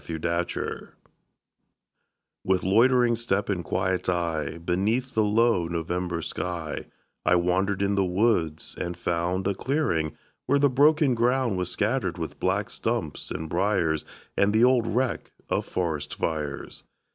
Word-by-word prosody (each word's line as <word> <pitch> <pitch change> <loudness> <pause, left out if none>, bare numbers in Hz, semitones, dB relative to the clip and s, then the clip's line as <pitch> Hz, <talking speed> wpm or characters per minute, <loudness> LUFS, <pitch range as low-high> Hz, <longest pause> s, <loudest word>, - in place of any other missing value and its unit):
IN 80 - -3
NOVEMBER 85 +2 -3 1.5
With 95 -1 +1
loitering 120 +4 +4
step 105 -4 -1
and 90 -4 -1
quiet 95 +2 -1
eye, 85 -4 -1
Beneath 100 +10 -1
the 110 - +3
low 105 -4 +3
November 85 0 -2
sky, 85 -4 -4 0.4
I 85 - +4
wandered 95 +3 +1
in 100 0 +1
the 100 -1 +2
woods, 90 -4 0
and 85 0 -3
found 85 +2 -1
A 100 - +1
clearing, 95 - -1 0.3
where 140 +2 +4
the 140 0 +4
broken 145 +1 +4
ground 120 -1 +1
Was 90 -1 -1
scattered 105 -5 -1
with 80 -2 -5
black 100 +4 0
stumps 115 -13 -2
and 80 - -4
briers, 85 -3 +1 0.3
And 100 +1 +3
the 110 +2 +4
old 125 -2 +4
wreck 125 +3 -1 0.2
of - - 0
forest 75 -5 -2
fires. 75 -3 -3
95 Hz, 140 wpm, -26 LUFS, 85-115 Hz, 1.5 s, loitering